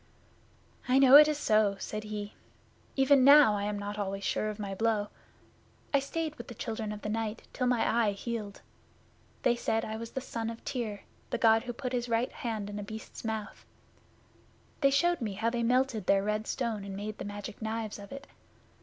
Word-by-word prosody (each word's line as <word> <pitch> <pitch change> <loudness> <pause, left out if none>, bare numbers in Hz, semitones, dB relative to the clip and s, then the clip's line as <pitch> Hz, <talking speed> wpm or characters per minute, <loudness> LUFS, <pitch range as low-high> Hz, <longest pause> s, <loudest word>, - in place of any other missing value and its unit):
'I 255 +1 +4
know 270 0 +8
it 300 +1 +10
is 305 -1 0
so,' 215 -7 +3
said 215 +2 -5
he. 210 -1 -5 0.6
'Even 270 0 +5
now 280 -4 +8
I 200 0 -2
am 210 0 -2
not 205 +1 -5
always 195 0 -3
sure 215 +2 0
of 210 - -5
my 200 -2 -4
blow. 210 0 0 0.8
I 280 - +5
stayed 310 +3 -3
with 235 - -9
the 240 - -9
Children 220 -1 -4
of 210 0 -7
the - - -3
Night 225 0 -3
till 250 - 0
my 245 -2 +2
eye 225 -3 +2
healed. 210 -1 -5 0.8
They 240 - +4
said 225 -1 -1
I 220 0 -4
was 230 0 -6
the - - -2
son 230 -3 -4
of 230 0 -9
Tyr, 220 -6 -3 0.3
the - - -1
God 225 +1 +4
who 245 - -3
put 250 +1 -5
his 245 -1 -1
right 230 +2 +1
hand 220 -4 -4
in 205 0 -5
a - - -5
Beast's 220 +1 -9
mouth. 220 -2 -4 1.2
They 275 - +4
showed 345 +4 +2
me 215 -4 -2
how 220 +4 -1
they 240 0 -1
melted 240 -3 +1
their 195 0 +4
red 210 +1 -1
stone 230 -6 -2
and 195 -1 -6
made 210 +1 -5
the - - -4
Magic 205 +1 -7
Knives 220 -1 -3
of 200 - -11
it. 275 +1 -8
225 Hz, 205 wpm, -30 LUFS, 210-250 Hz, 1.2 s, it